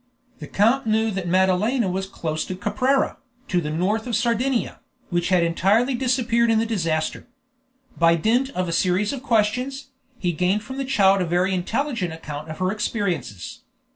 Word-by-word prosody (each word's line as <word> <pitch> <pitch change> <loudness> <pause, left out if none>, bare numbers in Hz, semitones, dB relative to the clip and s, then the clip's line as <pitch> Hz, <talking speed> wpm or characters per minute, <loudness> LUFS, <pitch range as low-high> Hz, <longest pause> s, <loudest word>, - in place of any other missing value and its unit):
The 150 - -8
count 230 - +2
knew 220 +1 +2
that 190 -3 -4
Madalena 190 +6 +2
was 190 +1 -2
close 155 -5 -3
to 185 - -5
Caprera, 260 +8 0 0.3
to 180 -1 +1
the 150 - -4
north 195 +9 -1
of 240 - -1
Sardinia, 235 +3 0 0.3
which 175 0 0
had 180 -2 +3
entirely 200 +10 +2
disappeared 240 -2 +1
in 225 - +3
the 225 - +2
disaster. 165 -8 -2 0.7
By 170 0 +5
dint 235 +10 +1
of 185 0 -1
a - - -2
series 185 +6 +1
of 270 - -5
questions, 250 +3 0 0.3
he 180 -6 -1
gained 180 +5 0
from 260 +5 -8
the 270 - -2
child 195 -7 +3
a - - +1
very 180 +3 +1
intelligent 220 - -2
account 155 -1 -7
of 155 - -6
her 185 0 0
experiences. 180 - -3
200 Hz, 170 wpm, -23 LUFS, 175-235 Hz, 0.7 s, By